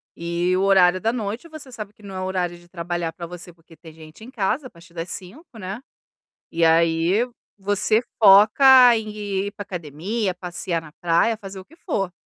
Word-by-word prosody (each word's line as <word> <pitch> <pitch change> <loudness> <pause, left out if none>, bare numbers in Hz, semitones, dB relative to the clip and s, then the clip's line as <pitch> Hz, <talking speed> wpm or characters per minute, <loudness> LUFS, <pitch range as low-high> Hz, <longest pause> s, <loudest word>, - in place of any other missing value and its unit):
e 170 +2 -1
o - - 0
horário 185 -2 +4
da 225 +3 0
noite 225 +5 -4
você 310 -5 -11
sabe 210 -3 -8
que 215 - -24
não 195 -2 -10
é - - -4
o 185 - -3
horário 180 -2 -2
de 175 0 -20
trabalhar 175 -1 -4
para 170 -2 -8
você, 175 0 -9
porque 165 -1 -21
tem 160 -2 -14
gente 160 +5 -14
em 250 - -11
casa 245 +6 -1
a - - -8
partir 170 0 -19
das 165 +2 -5
17h, 225 - -8
né, 195 +4 -6 0.7
e 165 0 +1
aí, 165 +7 +2 0.3
você 205 +2 +1 0.2
foca 235 +5 +7
em 220 -1 -4
ir 205 -1 -4
para 205 - -8
academia, 180 +5 -4
passear 175 -1 -4
na 150 -2 -14
praia, 175 +7 +2
fazer 195 -2 -9
o 190 - -10
que 315 - -21
for. 195 - -3
190 Hz, 200 wpm, -22 LUFS, 170-215 Hz, 0.7 s, foca